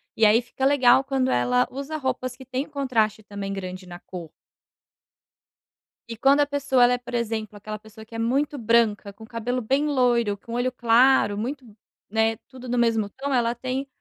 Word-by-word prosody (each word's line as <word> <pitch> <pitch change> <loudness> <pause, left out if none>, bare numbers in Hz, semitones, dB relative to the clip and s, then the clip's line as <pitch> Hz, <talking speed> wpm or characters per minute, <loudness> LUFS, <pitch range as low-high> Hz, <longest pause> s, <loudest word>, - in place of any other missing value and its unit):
E 220 - +4
aí, 215 +3 +5
fica 250 +2 -4
legal 265 -2 +5
quando 265 -1 0
ela 125 0 +2
usa 280 +4 -5
roupas 255 -2 -3
que 265 - -13
têm 260 +2 -3
contraste 235 -7 0
também 200 -1 -6
grande 185 -1 -6
na 175 0 -9
cor. 175 -3 -9 1.8
E 230 - -6
quando 275 +5 +4
a - - +4
pessoa 280 -3 +2
ela 245 +1 +5
é, - - +1
por 245 0 -11
exemplo, 225 -3 -2
aquela 215 +1 -7
pessoa 220 +1 -14
que 230 - -13
é - - -4
muito 275 +6 0
branca, 225 -4 +1
com 215 +3 -14
o - - -11
cabelo 240 +2 -3
bem 270 +6 +1
loiro, 240 -7 +2
com 230 +3 -10
olho 245 +2 0
claro, 240 -2 +4
muito 255 +5 -4 0.4
né, 220 +1 +1
tudo 255 -1 -11
do 245 0 -1
mesmo 225 -3 +2
tom, 275 +6 -4
ela 240 -2 +1
tem 260 +3 -3
240 Hz, 195 wpm, -24 LUFS, 215-265 Hz, 1.8 s, aí